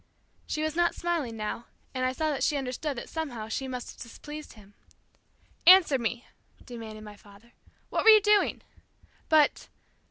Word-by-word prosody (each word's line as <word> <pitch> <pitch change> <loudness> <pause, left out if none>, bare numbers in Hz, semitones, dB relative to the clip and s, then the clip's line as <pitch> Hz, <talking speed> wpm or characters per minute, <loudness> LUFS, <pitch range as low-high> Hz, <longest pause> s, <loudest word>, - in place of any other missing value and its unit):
She 305 - -2
was 310 0 -2
not 345 0 +2
smiling 320 -10 -2
now, 215 +2 -4 0.3
and 255 - -2
I 255 - +1
saw 310 +4 -1
that 280 - -3
she 295 - +1
understood 270 +1 -4
that - - -6
somehow 255 -9 -5
she 265 +4 -3
must 250 -1 -6
have - - -16
displeased 295 +6 -9
him. 205 -2 -18 0.9
"Answer 360 -7 +8
me," 235 +1 -3 0.4
demanded 220 -3 -9
my 210 -1 -10
father. 205 +3 -19 0.4
"What - - 0
were - - +9
you 435 -1 +10
doing?" 420 -1 +2 0.7
"But 310 -2 +3
260 Hz, 165 wpm, -28 LUFS, 230-315 Hz, 0.9 s, you